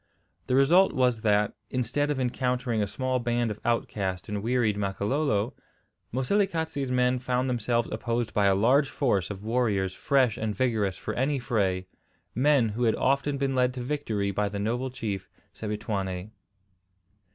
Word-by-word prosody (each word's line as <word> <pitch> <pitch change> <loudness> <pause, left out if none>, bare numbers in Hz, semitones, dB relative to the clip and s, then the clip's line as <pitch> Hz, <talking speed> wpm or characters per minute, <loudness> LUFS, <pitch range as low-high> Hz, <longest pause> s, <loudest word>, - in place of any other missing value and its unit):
The 125 - +2
result 170 +8 +5
was 125 -3 +2
that, 105 -1 +2 0.2
instead 130 +4 0
of 145 -2 -1
encountering 125 -2 0
a 100 - 0
small 130 +4 -1
band 120 -1 0
of 105 - -6
outcast 100 -5 -1
and 105 -1 -3
wearied 115 -2 +1
Makololo, 105 +3 0 0.6
Moselekatse's 160 - 0
men 125 0 +2
found 125 0 0
themselves 120 -1 0
opposed 115 -1 -2
by 100 -1 +3
a 95 - +4
large 130 +8 +3
force 110 -11 0
of 100 -1 -7
warriors 105 -5 0
fresh 130 -4 +2
and 110 -2 -2
vigorous 105 -5 0
for - - -4
any 140 +3 0
fray, 100 -8 0 0.5
men 130 -2 +3
who 115 +4 -1
had 110 - +3
often 140 +2 +1
been 135 -1 0
led 125 0 +2
to 125 - -4
victory 115 -8 -1
by 105 +1 0
the 100 - -5
noble 120 +6 -1
chief 105 -7 -4 0.2
Sebituane. 100 -3 -4
120 Hz, 155 wpm, -27 LUFS, 105-130 Hz, 0.6 s, result